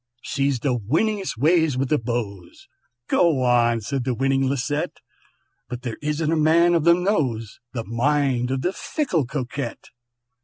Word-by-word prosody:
"She's 140 -3 -1
the 130 -3 +1
winningest 175 - -1
ways 160 0 +3
with 130 0 -1
the 150 - +2
beaux," 110 -7 -4 0.6
("Go 160 -7 +3
on!" 120 -2 +3
said 135 +4 -3
the 125 -1 -1
winning 135 +1 +1
Lisette), 140 +2 -2 0.7
"But 125 0 -6
there 120 -4 -4
isn't 150 +1 -1
a - - +2
man 165 +3 +4
of 165 -2 +1
them 170 +1 +4
knows 125 - -1
The 115 -3 -4
mind 125 +1 +1
of 130 0 -2
the 180 - 0
fickle 185 - -1
Coquette! 130 -2 -5
135 Hz, 155 wpm, -23 LUFS, 120-160 Hz, 0.7 s, man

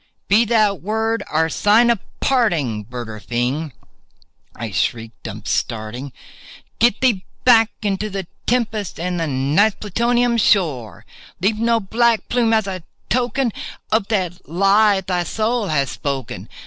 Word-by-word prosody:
"Be 215 +4 +4
that 210 - +2
word 220 +4 -1
our 160 +1 +2
sign 220 +7 +4
of 230 - 0 0.2
parting, 165 - +1
bird 120 0 -7
or 110 -1 -8
fiend!" 125 +8 -2 0.8
I 115 -2 -5
shrieked, 115 +3 -3
upstarting— 115 +5 -3 0.7
"Get 235 -1 +3
thee 230 -8 +2 0.2
back 225 -3 +6
into 205 +1 -1
the 195 -2 -4 0.2
tempest 220 -7 -1
and 180 0 -2
the 165 - -1
Night's 145 +10 +2
Plutonian 235 +3 +1
shore! 150 - +1 0.3
Leave 210 +4 +1
no 230 0 +2
black 230 +2 +1
plume 235 -2 +2
as 220 -2 +2
a 190 -2 -5 0.3
token 250 0 0 0.4
of 215 -2 +2
that 185 -6 -2
lie 195 +3 +4
thy 180 -1 -1
soul 220 +3 -1
hath 140 -5 0
spoken! 135 -4 -5
200 Hz, 135 wpm, -20 LUFS, 150-225 Hz, 0.8 s, back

